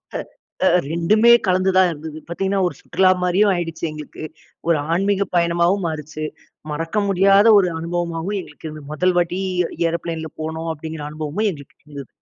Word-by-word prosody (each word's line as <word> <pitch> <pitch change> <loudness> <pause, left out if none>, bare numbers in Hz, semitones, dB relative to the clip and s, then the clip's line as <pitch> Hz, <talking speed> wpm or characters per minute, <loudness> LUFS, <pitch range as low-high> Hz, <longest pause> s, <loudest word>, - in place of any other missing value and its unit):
அ - - +1 0.5
அ - - +6 0.2
ரெண்டுமே 215 +8 +4 0.2
கலந்து 185 +1 +2
தான் 185 -1 +6
இருந்தது. 155 -1 -7
பார்த்தீங்கன்னா 195 +3 -1
ஒரு 175 - -2
சுற்றுலா 185 -1 +2
மாதிரியும் 190 +3 +3
ஆயிடுச்சு 165 -2 -4
எங்களுக்கு. 155 0 -9 0.4
ஒரு 170 - +4 0.2
ஆன்மீக 195 +3 +1
பயணமாவும் 170 +3 +2
மாறுச்சு. 155 0 -5 0.5
மறக்க 165 +5 -4
முடியாத 195 +2 +5
ஒரு 185 -2 +3
அனுபவமாவும் 170 +3 -3
எங்களுக்கு 155 -2 -11
இருந்தது. 150 -2 -10
முதல் 180 +4 +2
வாட்டி 175 +2 0 0.5
ஏரோப்ளேன்ல 165 -1 -4
போனோம் 160 +1 -4
அப்படிங்கிற 160 0 -7
அனுபவமும் 155 +8 -2
எங்களுக்கு 145 -6 -11
இருந்தது. 140 -3 -9
170 Hz, 145 wpm, -21 LUFS, 155-190 Hz, 0.5 s, அ